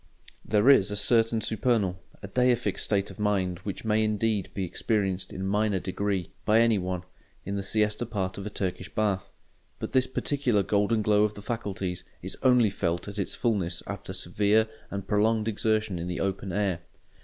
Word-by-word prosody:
There 105 +2 +2
is 120 -8 +7
a 105 - -2
certain 115 +1 +3
supernal, 105 -5 0 0.2
a - - -5
deific, 125 +3 +1
state 100 -2 0
of - - -14
mind 95 -4 0
which 95 +2 -6
may 110 0 +3
indeed 105 -1 0
be 95 - -1
experienced 95 +1 -1
in 95 - -6
a - - -2
minor 105 +1 +1
degree, 95 0 -2
by 110 +1 +4
any 115 -3 +4
one, 90 -1 -3 0.4
in 100 - -3
the 100 - -1
siesta 105 +3 0
part 100 -4 -3
of 100 - -5
a - - -3
Turkish 95 -3 -3
bath. 100 -3 0 0.5
But - - -5
this 130 0 +3
particular 130 -5 0
golden 105 +2 +1
glow 105 0 +4
of 105 0 0
the 100 - -9
faculties 100 -6 -3 0.2
is - - -3
only 125 -5 +5
felt 85 -2 -2
at 100 0 -6
its 100 - -2
fulness 95 -8 -1
after - - -6
severe 105 +2 +2 0.2
and 100 -1 -5
prolonged 110 +1 +2
exertion 110 -3 0
in 85 - -4
the 90 - -3
open 95 0 -2
air. 95 -2 0
105 Hz, 185 wpm, -27 LUFS, 95-110 Hz, 0.5 s, is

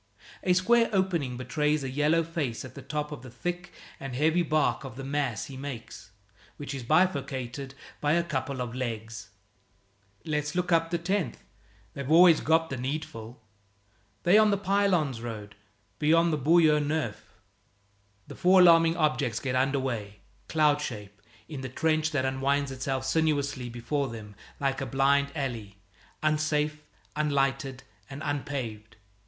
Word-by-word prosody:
A 180 - +3
square 230 +6 +3
opening 175 - 0
betrays 150 +3 0
a 135 - -3
yellow 150 +4 +2
face 155 -9 -3
at 130 - -11
the 140 - -9
top 150 +2 -4
of 150 - -7
the 130 - -10
thick 175 +8 -5 0.3
and 135 -2 -6
heavy 160 +5 +3
bark 155 -3 +1
of 130 -3 -8
the 135 - -7
mass 135 -4 -2
he 135 - -9
makes, 130 -6 -8 0.5
which 145 -1 -6
is 135 - -5
bifurcated 135 -3 0 0.2
by 145 0 +1
a 170 +1 +2
couple 135 -4 -3
of 120 -2 -4
legs. 115 -4 -5 1.0
"Let's 150 0 -2
look 180 0 -1
up 165 0 +3
the 170 - 0
10th. 185 +2 -1 0.6
They've 140 -1 -6
always 165 0 +7
got 160 0 +2
the 130 - -2
needful. 125 -4 -5 0.8
They're 200 +5 +6
on 215 - +4
the 200 - +2
Pylones 190 - +1
road, 105 -3 -7 0.5
beyond 165 +2 +3
the - - +1
Boyau 155 +1 +5
Neuf." 145 -10 -3 0.9
The - - -10
four 185 0 +5
alarming 165 -1 +6
objects 150 -8 +1
get 130 -2 -2
under 135 +2 +2
way, 105 -6 -4 0.3
cloud 150 -2 +3
shape, 105 -7 -7 0.3
in 145 -4 -6
the 130 - -5
trench 155 +3 +1
that 140 -4 0
unwinds 135 +1 0
itself 130 0 -3
sinuously 140 -4 0
before 135 +4 -2
them 110 -3 -9 0.3
like 135 -1 -1
a 135 - -3
blind 140 +2 +2
alley, 115 -9 -4 0.5
unsafe, 150 0 +1 0.3
unlighted, 135 -3 0 0.3
and 140 +2 -7
unpaved. 130 -7 -4
145 Hz, 150 wpm, -28 LUFS, 130-160 Hz, 1.0 s, always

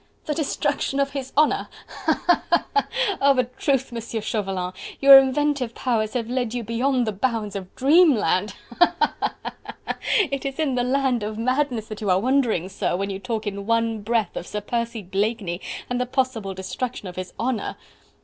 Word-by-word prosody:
"The 300 - -1
destruction 290 -2 -1
of 275 0 +1
his 270 -2 -5
honour!... 305 0 +3 0.2
ha! - - -2
ha! 350 - +3
ha! - - +3
ha!... 420 - +2 0.3
of 275 -1 +5
a 255 - +4
truth, 265 +1 -1
Monsieur 230 -1 -4
Chauvelin, 195 -4 -2 0.3
your 275 0 +10
inventive 270 -2 0
powers 220 -4 0
have 235 -3 -2
led 245 -1 -2
you 240 - -2
beyond 245 +3 +1
the 215 - -1
bounds 215 -1 -2
of 190 -2 -7
dreamland!... 255 - +4 0.2
Ha! 350 - +5
ha! - - +2
ha! - - -1 0.5
ha!... - - -3 0.3
It 275 -1 -2
is 275 -1 -4
in 305 -4 0
the 245 -1 +1
land 260 -1 +1
of 215 +1 -4
madness 255 -1 0
that 215 0 -7
you 205 - -1
are 185 0 +4
wandering, 240 -6 +1
sir, 190 -2 -1
when 195 +2 -2
you 190 - -4
talk 220 +1 -3
in 200 0 -4
one 230 -1 +1
breath 220 -2 0
of 175 - -5
Sir 210 - -4
Percy 235 0 -3
Blakeney 195 -1 -2 0.3
and 245 0 -1
the 250 - -1
possible 245 -7 -1
destruction 205 +4 -4
of 180 - -8
his 185 -1 -5
honour!" 235 -2 -1
235 Hz, 190 wpm, -23 LUFS, 205-265 Hz, 0.5 s, your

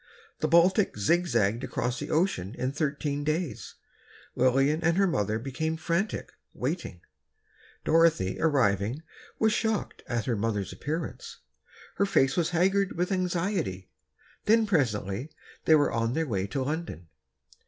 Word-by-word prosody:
The 155 - +1
Baltic 170 - +4
zigzagged 115 - +1
across 125 0 -2
the - - -5
ocean 150 - 0
in 130 +1 -1
thirteen 145 0 -2
days. 155 +1 -3 0.6
Lillian 135 +5 +2
and 170 +2 +2
her 195 - +4
mother 110 - 0
became 160 +7 -3
frantic, 170 +5 -2 0.2
waiting. 135 - -4 0.8
Dorothy, 160 - +3
arriving, 125 - +1 0.3
was 220 -1 +3
shocked 220 -1 -1
at 120 -3 -2
her 120 - 0
mother's 105 -3 -2
appearance. 155 +2 -5 0.6
Her 200 - +2
face 135 -7 +3
was 170 -2 +1
haggard 190 +3 +2
with 180 +3 0
anxiety. 180 - -1 0.5
Then, 225 +1 +4
presently, 125 - 0 0.4
they 160 - +6
were 145 -1 +3
on 115 +1 0
their 160 +2 0
way 100 -7 -2
to 135 +6 -2
London. 145 - -4
150 Hz, 130 wpm, -28 LUFS, 115-170 Hz, 0.8 s, they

